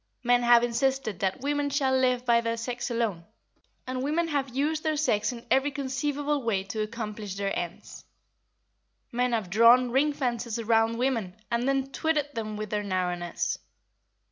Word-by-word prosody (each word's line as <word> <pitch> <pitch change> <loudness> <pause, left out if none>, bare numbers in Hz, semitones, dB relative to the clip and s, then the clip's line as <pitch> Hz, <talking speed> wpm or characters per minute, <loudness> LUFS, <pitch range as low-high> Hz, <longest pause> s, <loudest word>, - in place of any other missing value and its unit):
Men 245 0 +4
have 240 0 +6
insisted 240 -4 0
that 190 +5 -1
women 290 +1 0
shall 270 -2 +1
live 255 -1 +2
by 235 -1 +4
their 230 0 -2
sex 240 +2 -4
alone, 225 -8 -1 0.6
and 255 0 -3
women 320 +5 0
have 280 -3 -1
used 295 +5 -1
their 310 -1 0
sex 240 -9 +1
in 235 -1 -9
every 270 +2 +4
conceivable 285 +1 -2
way 215 -6 0
to 215 +3 -4
accomplish 215 -2 -5
their 200 0 -2
ends. 175 +1 -6 1.1
Men 245 +1 0
have 210 -6 -1
drawn 235 +4 +6
ring 280 +4 +3
fences 240 -5 -2
round 225 0 +2
women 230 -7 -1 0.2
and 235 +3 +1
then 270 0 0
twitted 295 -1 0
them 215 -2 -4
with 215 -1 -5
their 210 -1 0
narrowness. 180 -3 -2
240 Hz, 165 wpm, -27 LUFS, 220-270 Hz, 1.1 s, have